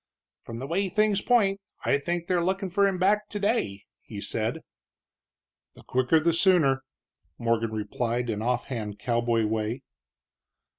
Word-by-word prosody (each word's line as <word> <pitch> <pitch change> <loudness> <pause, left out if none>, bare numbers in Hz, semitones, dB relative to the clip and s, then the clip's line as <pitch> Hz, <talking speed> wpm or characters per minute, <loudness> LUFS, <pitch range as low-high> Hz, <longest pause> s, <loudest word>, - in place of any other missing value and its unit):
"From 115 - -8
the 130 - -5
way 190 +6 0
things 210 +1 +2
point, 200 -5 +2 0.2
I 140 - +3
think 170 +3 -2
they're 175 -1 +1
lookin' 190 +1 -1
for 200 +2 +3
him 195 -2 -1
back 205 +3 +2
today," 105 - -1 0.2
he - - -8
said. - - -2 1.1
"The - - -15
quicker 130 +5 +2
the 165 +2 +2
sooner," 165 -7 +4 0.6
Morgan 115 -1 0
replied 120 +3 -2
in 110 -2 -2
offhand 120 -3 -2
cowboy 120 -1 +1
way. 110 +4 -2
140 Hz, 140 wpm, -27 LUFS, 115-190 Hz, 1.1 s, sooner